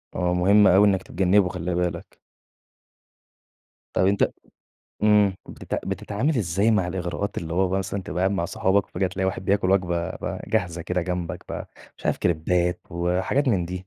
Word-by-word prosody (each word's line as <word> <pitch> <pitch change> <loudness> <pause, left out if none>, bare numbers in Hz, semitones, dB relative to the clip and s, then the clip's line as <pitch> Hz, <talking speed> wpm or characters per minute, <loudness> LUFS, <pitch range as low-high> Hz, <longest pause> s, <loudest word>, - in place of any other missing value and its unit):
آه، 90 0 0
مهم 100 +3 +5
أوي 95 +3 +6
إنك 95 -2 +1
تتجنّبه 95 +1 +2
خلِّ 90 0 -3
بالك. 90 0 -3 1.7
طيب 95 - +3
أنت 100 +1 +2 0.7
امم، 105 -3 +4
بتتع - - -5
بتتعامل 130 +9 -1
إزاي 100 +2 +1
مع 105 -5 +2
الإغراءات 90 +2 -3
اللي 85 -1 -5
هو 95 +1 +2
بقى 95 +1 0
مثلًا 95 +1 -3
تبقى 90 - -5
قاعد 95 +1 +2
مع 95 -4 -1
صحابك، 95 +1 +1
وفجأة 95 - -1
تلاقي 95 +1 -2
واحد 95 0 -3
بياكل 95 -1 +1
وجبة 90 -3 +1
بقى - - -5
جاهزة 85 -1 -1
كده 90 +1 -1
جنبك 90 -1 -4
بقى، - - -6 0.3
مش - - -6
عارف - - +1
كريبات 90 +2 0
وحاجات 90 +11 0
من 95 -7 +2
دي، 90 +2 -6
95 Hz, 170 wpm, -24 LUFS, 90-100 Hz, 1.7 s, أوي